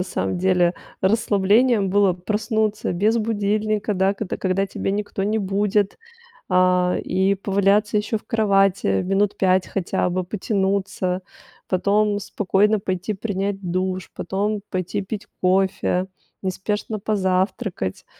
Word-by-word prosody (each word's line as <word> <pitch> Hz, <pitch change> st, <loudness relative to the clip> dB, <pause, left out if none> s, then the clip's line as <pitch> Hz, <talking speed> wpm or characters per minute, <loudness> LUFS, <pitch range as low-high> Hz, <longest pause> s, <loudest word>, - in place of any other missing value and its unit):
на 180 Hz, -, 0 dB
самом 185 Hz, -1 st, -2 dB
деле, 180 Hz, -1 st, +2 dB, 0.3 s
расслаблением 205 Hz, +1 st, +3 dB
было 200 Hz, -1 st, +4 dB
проснуться 215 Hz, +3 st, -1 dB
без 215 Hz, +6 st, +2 dB
будильника, 215 Hz, 0 st, 0 dB
да, 190 Hz, +1 st, +2 dB
когда 200 Hz, -1 st, -4 dB
когда 190 Hz, +1 st, 0 dB
тебе 195 Hz, -, -3 dB
никто 205 Hz, -1 st, -3 dB
не 215 Hz, +2 st, +1 dB
будет. 200 Hz, 0 st, 0 dB, 0.5 s
А, 180 Hz, 0 st, +3 dB
и 190 Hz, +1 st, +1 dB
поваляться 200 Hz, +2 st, +2 dB
ещё 210 Hz, +1 st, -1 dB
в -, -, -15 dB
кровати 195 Hz, -, +2 dB
минут 195 Hz, +2 st, +1 dB
5 185 Hz, -1 st, +2 dB
хотя 180 Hz, -1 st, -1 dB
бы, 185 Hz, +1 st, -1 dB
потянуться, 190 Hz, -1 st, -1 dB, 0.5 s
потом 205 Hz, +3 st, +2 dB
спокойно 205 Hz, +1 st, +1 dB
пойти 185 Hz, +1 st, -2 dB
принять 200 Hz, -1 st, -2 dB
душ, 185 Hz, +1 st, -2 dB
потом 200 Hz, +3 st, -2 dB
пойти 185 Hz, +1 st, -2 dB
пить 205 Hz, +2 st, -6 dB
кофе, 185 Hz, 0 st, +1 dB, 0.3 s
неспешно 205 Hz, +3 st, -3 dB
позавтракать. 190 Hz, -, -1 dB
195 Hz, 120 wpm, -22 LUFS, 185-210 Hz, 0.5 s, было